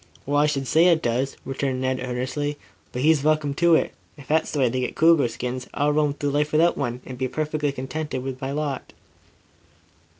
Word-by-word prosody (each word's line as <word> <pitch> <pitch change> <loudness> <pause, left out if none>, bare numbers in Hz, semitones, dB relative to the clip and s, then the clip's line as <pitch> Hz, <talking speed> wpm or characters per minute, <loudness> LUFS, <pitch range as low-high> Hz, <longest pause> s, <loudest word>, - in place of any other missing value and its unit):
"Well, 145 +1 0
I 150 - +4
should 140 -2 -1
say 160 +6 +4
it 165 -2 +3
does," 125 +3 -1
returned 135 -1 -2
Ned 130 0 0
earnestly. 130 +4 -3 0.3
"But 125 - -3
he's 155 -2 +4
welcome 155 -2 +2
to 170 +2 +4
it. - - +1 0.2
If 140 -3 -13
that's 160 +1 +1
the - - -4
way 130 -3 +3
they 130 +2 -1
get 125 - -3
cougar 160 -5 +5
skins, 125 +2 -5
I'll 145 +1 +2
roam 150 -1 +1
through 145 -1 -2
life 150 +1 0
without 165 +3 +4
one, 125 -2 -3
and 125 -1 -8
be 130 - 0
perfectly 150 +1 -1
contented 135 +1 -4
with 130 0 -5
my 135 +1 -3
lot." 145 -2 -3
140 Hz, 205 wpm, -24 LUFS, 130-150 Hz, 0.3 s, cougar